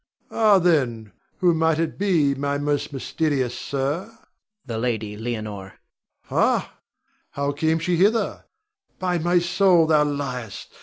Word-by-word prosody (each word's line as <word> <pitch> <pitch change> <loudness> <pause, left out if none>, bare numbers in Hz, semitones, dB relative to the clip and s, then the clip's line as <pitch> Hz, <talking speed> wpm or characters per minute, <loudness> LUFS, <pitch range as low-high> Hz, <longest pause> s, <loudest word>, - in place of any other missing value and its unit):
Rod. - - -12
Ah, 215 -3 +5
then, 130 - +1 0.3
who 175 -2 +4
might 160 -1 +2
it 165 +2 -2
be, 170 -8 +2
my 140 +1 -2
most 145 +1 -1
mysterious 135 -2 -1
sir? 140 +7 -2
Adrian. 225 +1 -20 0.5
The 115 -3 -4
Lady 110 -3 -2
Leonore. 110 -3 -5 0.7
Rod. - - +2
Ha! - - -19 0.6
how 140 0 -1
came 160 +3 0
she 170 +2 0
hither? 210 +6 +1 0.5
By 180 -2 -1
my 175 +2 +2
soul, 175 -1 +4
thou 155 -2 +4
liest! 130 -6 -5
145 Hz, 145 wpm, -23 LUFS, 125-175 Hz, 0.7 s, Ah